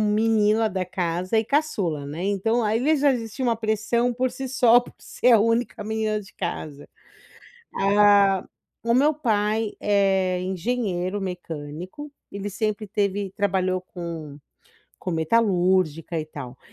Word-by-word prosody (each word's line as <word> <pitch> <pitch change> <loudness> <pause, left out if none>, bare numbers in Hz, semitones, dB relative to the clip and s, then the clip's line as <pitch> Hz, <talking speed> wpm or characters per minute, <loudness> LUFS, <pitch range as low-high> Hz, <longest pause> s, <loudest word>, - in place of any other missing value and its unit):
menina 220 0 +3
da 190 -2 -2
casa 180 +2 -2
e 220 - +2
caçula, 200 - 0
né, 160 +5 -5
então 215 +4 +1
aí 240 +9 +2
já 285 -1 +4
existia 235 +1 -4
uma 235 -1 +2
pressão 220 +2 0
por 255 +1 -1
si 260 +1 -6
só, 245 -2 +5
por 245 - -12
ser 250 - +2
a 225 - +6
única 230 0 0
menina 215 0 -1
de 205 -1 -14
casa. 155 -5 -5 0.8
Ah, 200 -1 +4 0.4
o 235 0 +1
meu 285 +5 +4
pai 220 -5 0
é 190 -3 +2
engenheiro 190 0 -2
mecânico. 180 - -7 0.2
Ele 200 +1 -5
sempre 215 +1 -2
teve 200 -1 -1
trabalhou 185 -2 +1
com 165 -5 -7 0.6
com 180 - -4
metalúrgica 175 -3 +1
e 155 - -6
tal. 135 -5 -9
205 Hz, 135 wpm, -24 LUFS, 180-225 Hz, 0.8 s, a